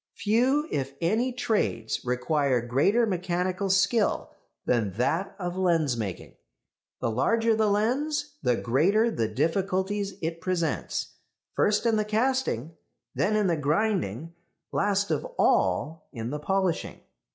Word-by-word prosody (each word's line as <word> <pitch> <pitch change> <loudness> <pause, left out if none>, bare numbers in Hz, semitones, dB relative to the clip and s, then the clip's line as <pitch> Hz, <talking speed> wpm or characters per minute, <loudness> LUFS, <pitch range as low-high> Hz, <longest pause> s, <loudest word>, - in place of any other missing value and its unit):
Few, 245 +9 +2
if 135 0 -2
any, 220 +9 +1
trades 215 - -1
require 125 +1 +1
greater 140 - +2
mechanical 185 0 -1
skill 200 +3 +2 0.3
than 110 -6 +1
that 160 - -1
of 180 -2 -3
lensmaking; 150 - -1 0.6
the 115 - 0
larger 225 - +2
the 215 -1 +2
lens 285 +8 0
the 125 - +2
greater 190 - +2
the 115 - -1
difficulties 190 - -1
it 165 +1 -3
presents, 175 -2 -2 0.4
first 210 +3 +2
in 225 -2 +3
the 215 - +2
casting, 215 - -1 0.4
then 215 - +1
in 210 -1 +2
the 175 -3 +2
grinding, 160 - -1 0.4
last 200 0 +1
of - - 0
all 160 +1 +1
in 115 -2 -5
the 150 - -3
polishing. 190 +2 -1
185 Hz, 125 wpm, -27 LUFS, 145-215 Hz, 0.6 s, in